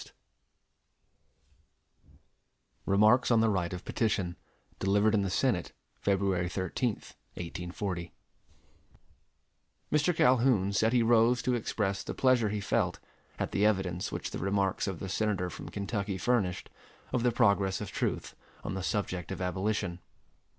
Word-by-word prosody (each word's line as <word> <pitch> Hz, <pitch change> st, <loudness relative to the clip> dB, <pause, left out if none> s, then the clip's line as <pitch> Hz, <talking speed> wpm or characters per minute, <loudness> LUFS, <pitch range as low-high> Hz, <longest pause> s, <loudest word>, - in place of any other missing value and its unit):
Trent] -, -, -18 dB, 2.7 s
REMARKS 105 Hz, +6 st, +4 dB
ON 115 Hz, -2 st, +5 dB
THE 110 Hz, -1 st, +3 dB
RIGHT 90 Hz, -3 st, -1 dB
OF 90 Hz, -1 st, -6 dB
PETITION 100 Hz, -6 st, -1 dB, 0.4 s
Delivered 100 Hz, +3 st, +3 dB
in 105 Hz, -, +3 dB
the 95 Hz, -, -1 dB
Senate, -, -, 0 dB, 0.3 s
February 95 Hz, -3 st, +1 dB
13th, 100 Hz, +5 st, -2 dB, 0.2 s
1840 90 Hz, 0 st, -5 dB, 1.8 s
Mr. 150 Hz, +3 st, +2 dB
Calhoun 125 Hz, -8 st, +3 dB
said 110 Hz, +3 st, +2 dB
he 120 Hz, -1 st, +3 dB
rose 115 Hz, +1 st, +4 dB
to 125 Hz, -, +1 dB
express 105 Hz, -4 st, -1 dB
the -, -, -6 dB
pleasure 125 Hz, -4 st, +3 dB
he 105 Hz, 0 st, -2 dB
felt 100 Hz, -, 0 dB, 0.4 s
at -, -, -2 dB
the 100 Hz, -, +1 dB
evidence 95 Hz, -4 st, +1 dB
which -, -, -4 dB
the -, -, -4 dB
remarks 100 Hz, 0 st, 0 dB
of 95 Hz, -3 st, -3 dB
the 95 Hz, -, -6 dB
Senator 95 Hz, -2 st, -1 dB
from -, -, -8 dB
Kentucky 100 Hz, -1 st, -3 dB
furnished, 95 Hz, -3 st, 0 dB, 0.4 s
of 125 Hz, -, +1 dB
the 125 Hz, 0 st, +3 dB
progress 100 Hz, -5 st, +2 dB
of 105 Hz, -, -6 dB
truth -, -, -2 dB, 0.3 s
on -, -, -3 dB
the 95 Hz, -, -3 dB
subject 90 Hz, -2 st, -2 dB
of -, -, -4 dB
abolition. 95 Hz, 0 st, -1 dB
100 Hz, 135 wpm, -30 LUFS, 95-115 Hz, 2.7 s, ON